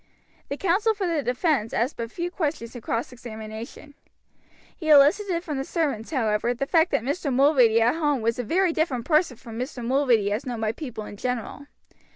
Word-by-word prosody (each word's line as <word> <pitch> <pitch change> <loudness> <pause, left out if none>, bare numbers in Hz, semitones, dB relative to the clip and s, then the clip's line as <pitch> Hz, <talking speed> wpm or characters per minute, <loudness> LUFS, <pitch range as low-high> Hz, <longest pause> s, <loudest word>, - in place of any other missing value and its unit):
The 280 - -3
counsel 390 +6 +2
for 400 -2 -2
the 335 -4 0
defense 250 - 0
asked 245 +6 0
but 230 -1 -5
few 345 +6 -4
questions 290 -10 -3
in 245 - -7
cross 230 +3 -2
examination. 225 +3 -9 0.8
He 315 -4 -5
elicited 335 +5 +5
from 300 -6 -4
the - - -1
servants, 280 -8 -2
however, 235 -3 0
the 275 - -2
fact 325 +3 +3
that - - 0
Mr. 285 +2 -2
Mulready 255 -4 +4
at 240 - +3
home 295 -6 0
was 230 +2 0
a - - -1
very 345 - +1
different 270 -8 -1
person 305 -5 +2
from 230 -2 -9
Mr. 250 -2 -5
Mulready 245 -6 +2
as 210 +3 -1
known 245 -3 -4
by 220 -1 0
people 225 -4 -7
in 205 - -9
general. 250 +4 -4
265 Hz, 190 wpm, -25 LUFS, 230-315 Hz, 0.8 s, elicited